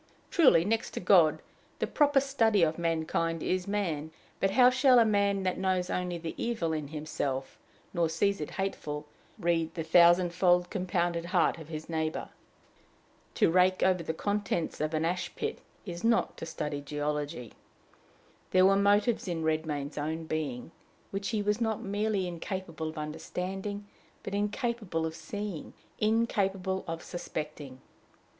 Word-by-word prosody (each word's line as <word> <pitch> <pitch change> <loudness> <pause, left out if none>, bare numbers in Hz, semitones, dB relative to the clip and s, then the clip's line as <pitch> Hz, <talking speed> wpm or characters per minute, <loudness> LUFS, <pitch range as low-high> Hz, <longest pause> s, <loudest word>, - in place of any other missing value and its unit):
Truly, 260 - +5
next 225 +2 -1
to - - -2
God, 175 -4 +4 0.3
the - - 0
proper 290 -2 +3
study 225 -8 +2
of 160 +1 +1
mankind 165 0 -1
is 185 +1 -1
man; 170 -7 -1 0.3
but 195 - +2
how 250 +5 +6
shall 260 0 +5
a 230 - +7
man 200 -2 +2
that 185 -1 -1
knows 185 -1 0
only 180 -1 -2
the 165 -1 -5
evil 200 -9 -1
in 155 -2 -3
himself, 145 -3 -4 0.3
nor 170 -3 +1
sees 195 +3 +1
it 150 - -4
hateful, 150 -6 -3 0.3
read 165 -4 0
the 165 - -2
thousandfold 175 +1 +4
compounded 175 -3 -1
heart 175 -2 +2
of 160 - -10
his 155 -1 -6
neighbor? 160 -1 -2 1.1
To - - +4
rake 185 +1 +4
over 185 -2 +3
the 160 - -2
contents 200 -5 -2
of 155 +1 -1
an 155 +1 +1
ash 175 +2 -2
pit, 445 0 -3 0.3
is 175 -2 -6
not 230 0 +2
to 165 - -6
study 150 -2 -4
geology. 145 -4 -3 1.0
There 185 0 +5
were 195 +1 +5
motives 205 +3 +3
in 165 -2 -2
Redmain's 155 -2 -1
own 160 +2 -2
being, 155 -4 -3 0.4
which 200 +1 -3
he 215 -3 -1
was 210 +3 0
not 220 -2 -1
merely 205 -1 0
incapable 170 -2 -5
of 155 - -10
understanding, 185 +6 -4 0.4
but - - -5
incapable 210 -4 -1
of 160 - -3
seeing, 205 -1 -6 0.3
incapable 195 -4 +1
of 165 0 -4
suspecting. 150 -6 -6
180 Hz, 150 wpm, -30 LUFS, 160-200 Hz, 1.1 s, a